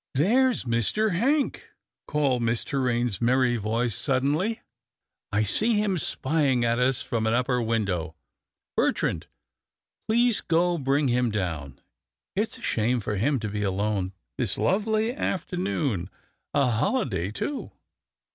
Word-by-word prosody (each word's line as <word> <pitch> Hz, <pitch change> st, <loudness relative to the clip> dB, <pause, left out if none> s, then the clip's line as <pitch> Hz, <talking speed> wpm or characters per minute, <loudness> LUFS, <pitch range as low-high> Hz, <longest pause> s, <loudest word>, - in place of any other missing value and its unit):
^'There's 245 Hz, -, +3 dB
Mr. 120 Hz, -, +1 dB
Hank," 275 Hz, -, 0 dB, 0.4 s
called 140 Hz, -5 st, +1 dB
Miss 115 Hz, 0 st, 0 dB
Torraine's 120 Hz, -5 st, -1 dB
merry 125 Hz, 0 st, +3 dB
voice 115 Hz, +2 st, 0 dB
suddenly, 150 Hz, -, 0 dB, 0.3 s
" -, -, -62 dB
I 105 Hz, +1 st, +2 dB
see 215 Hz, -, +3 dB
him 205 Hz, -4 st, +1 dB
spying 135 Hz, -5 st, +2 dB
at 115 Hz, +1 st, +1 dB
us 130 Hz, 0 st, +1 dB
from 110 Hz, -2 st, -1 dB
an 110 Hz, -, +2 dB
upper 125 Hz, 0 st, +1 dB
window. 100 Hz, -8 st, -1 dB, 0.6 s
Bertrand, -, -, 0 dB, 0.8 s
please 235 Hz, 0 st, +3 dB
go 170 Hz, +1 st, +1 dB
bring 140 Hz, +1 st, +1 dB
him 125 Hz, 0 st, +2 dB
down. 80 Hz, -, -4 dB, 0.6 s
It's -, -, -1 dB
a -, -, -15 dB
shame 120 Hz, +3 st, +1 dB
for 105 Hz, -1 st, -3 dB
him 135 Hz, +6 st, +1 dB
to 110 Hz, -, -2 dB
be 105 Hz, 0 st, -3 dB
alone 100 Hz, -1 st, -1 dB, 0.3 s
this -, -, 0 dB
lovely 215 Hz, +4 st, +1 dB
afternoon 165 Hz, -, -2 dB, 0.2 s
— -, -, -51 dB
a 140 Hz, -1 st, +4 dB
holiday, 110 Hz, -, 0 dB
too." 270 Hz, -, -4 dB
125 Hz, 135 wpm, -26 LUFS, 110-175 Hz, 0.8 s, a